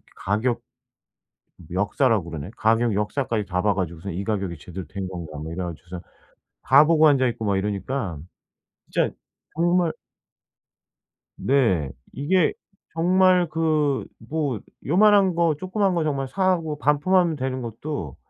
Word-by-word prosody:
가격 110 +5 -1 1.1
역사라고 105 - +1
그러나요? 80 +3 -6
가격 115 +1 +2
역사까지 105 +1 -1
다 90 -1 -1
봐 105 0 +2
가지고선 90 0 -4
'이 95 +4 -3
가격이 95 -6 -2
제대로 90 +2 -8
된 95 +3 -5
건가.' 85 -5 -7
뭐 80 +2 -6
이래 90 +2 -3
가지고서 85 +1 -7 0.6
다 140 +3 +6
보고 160 -1 +5
앉아있고 130 -5 +1
막 100 -2 +1
이러니까 100 - -3 0.7
진짜 - - +1 0.5
정말 175 0 +2 1.5
네. 95 - +2 0.2
이게 165 +5 +2 0.4
정말 180 +1 +4
그 155 -3 +1 0.2
뭐 145 -7 -1 0.3
요만한 195 +3 +5
거 170 -2 +2
조그만 190 +1 0
거 170 - +1
정말 140 -3 -1
사고 170 -2 0
반품하면 165 +4 +2
되는 130 -2 -3
것도 115 - -5
130 Hz, 270 characters per minute, -24 LUFS, 95-160 Hz, 1.5 s, 다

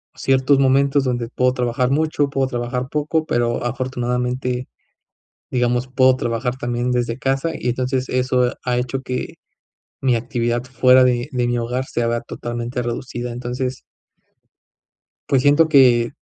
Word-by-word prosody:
ciertos 135 +1 +2
momentos 135 +1 +3
donde 120 -2 -2
puedo 125 0 +1
trabajar 125 0 0
mucho, 150 0 +1
puedo 135 -1 0
trabajar 125 0 -3
poco, 155 +1 -1
pero 120 -4 0
afortunadamente, 125 0 -2 0.8
digamos, 125 0 0
puedo 130 0 +4
trabajar 120 0 -2
también 120 0 -2
desde 120 -1 -1
casa, 135 +5 0
y 125 - -3
entonces, 130 +1 -1
eso 125 -1 +1
ha 125 -1 0
hecho 130 +2 -2
que 125 -1 -4 0.7
mi 130 -2 +2
actividad 120 0 -1
fuera 130 +1 +4
de 120 -1 +1
de 125 -1 0
mi 120 0 0
hogar 125 +3 -2
se 120 - -2
haga 115 0 0
totalmente 120 +1 -5
reducida. 120 0 -4
Entonces 125 +1 -4 1.5
pues, 135 -2 +3
siento 145 +3 +4
que 125 -5 +5
125 Hz, 140 wpm, -20 LUFS, 120-130 Hz, 1.5 s, que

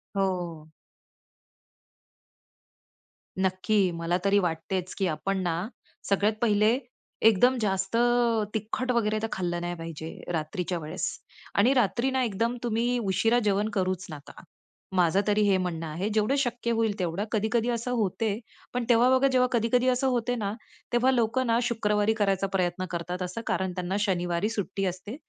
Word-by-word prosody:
हो. 175 -5 -2 2.7
नक्की. 190 +1 +2
मला 170 +1 -1
तरी 200 +1 +4
वाटतेच 180 +1 -2
की 195 - +1
आपण 195 +4 -1
ना, 175 +2 -1 0.4
सगळ्यात 205 +2 +3
पहिले 215 +1 +3 0.5
एकदम 245 +5 +4
जास्त 195 +1 0 0.6
तिखट 220 +4 -2
वगैरे 215 -3 +1
तर - - +1
खाल्लं 175 -2 -2
नाही 175 0 -3
पाहिजे 165 -1 -7 0.2
रात्रीच्या 170 +3 -2
वेळेस. 160 +4 -3 0.5
आणि 230 +7 +4
रात्री 245 +1 +1
ना 260 0 +1
एकदम 230 +2 -1
तुम्ही 240 +1 +1
उशिरा 225 +3 +2
जेवण 205 +2 +1
करूच 185 0 -1
नका. 145 -2 -10 0.5
माझं 180 +1 +3
तरी 210 0 +3
हे 200 -2 +4
म्हणणं 175 -3 -3
आहे 165 +6 -3
जेवढं 215 +5 +2
शक्य 240 -2 -1
होईल 225 -2 +1
तेवढं. 180 +2 -1
कधी-कधी 225 +2 +1
असं 240 +1 -2
होते, 220 -2 0 0.3
पण 250 0 -1
तेव्हा 240 +1 +5
बघा 260 +1 +4
जेव्हा 250 -1 +4
कधी-कधी 245 +2 +2
असं 255 +1 +1
होते 245 -1 0
ना, 205 -4 -2 0.4
तेव्हा 245 +2 +4
लोकं 250 +1 +1
ना 230 0 +3
शुक्रवारी 215 -2 +1
करायचा 195 -3 +1
प्रयत्न 185 -1 0
करतात 175 +1 -4
असं 180 +5 -4
कारण 190 -1 0
त्यांना 180 +1 -2
शनिवारी 180 -1 0
सुट्टी 195 -3 -2
असते. 185 +5 -4
205 Hz, 145 wpm, -27 LUFS, 180-230 Hz, 2.7 s, तेव्हा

